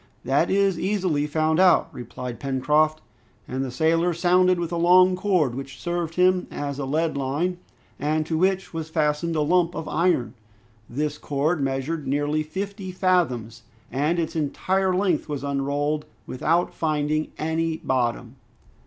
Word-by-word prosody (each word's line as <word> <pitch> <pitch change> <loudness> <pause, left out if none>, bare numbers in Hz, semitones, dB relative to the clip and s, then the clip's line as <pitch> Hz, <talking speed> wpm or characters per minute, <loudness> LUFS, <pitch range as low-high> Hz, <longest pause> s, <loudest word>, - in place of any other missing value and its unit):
"That 140 +6 +2
is 195 -2 +2
easily 180 -7 0
found 155 +2 +1
out," 185 -1 +5
replied 125 0 -7
Pencroft. 150 +3 +1 0.5
And 130 +1 -2
the 135 - -3
sailor 165 +6 +1
sounded 180 +1 +3
with 170 -1 -3
a - - -1
long 180 +2 +5
cord, 180 -9 +1
which 135 0 -7
served 175 -2 -3
him 180 0 +3
as 145 -1 -4
a 140 - -2
lead 155 +4 0
line, 145 +7 -1 0.4
and 155 +2 0
to 160 - -2
which 190 +3 0
was 160 -1 -4
fastened 160 +1 0
a 155 - +1
lump 175 +2 +2
of 160 - -5
iron. 160 -8 +1 0.6
This 150 +4 -2
cord 150 +3 0
measured 135 +3 -2
nearly 145 +2 0
fifty 190 +5 -5
fathoms, 130 - 0 0.3
and 150 +6 0
its 165 -1 -2
entire 185 +5 0
length 180 -5 0
was 145 -2 -4
unrolled 145 +2 -1 0.2
without 165 +7 0
finding 155 -1 0
any 160 +1 -1
bottom. 125 -2 -2
155 Hz, 150 wpm, -24 LUFS, 140-175 Hz, 0.6 s, out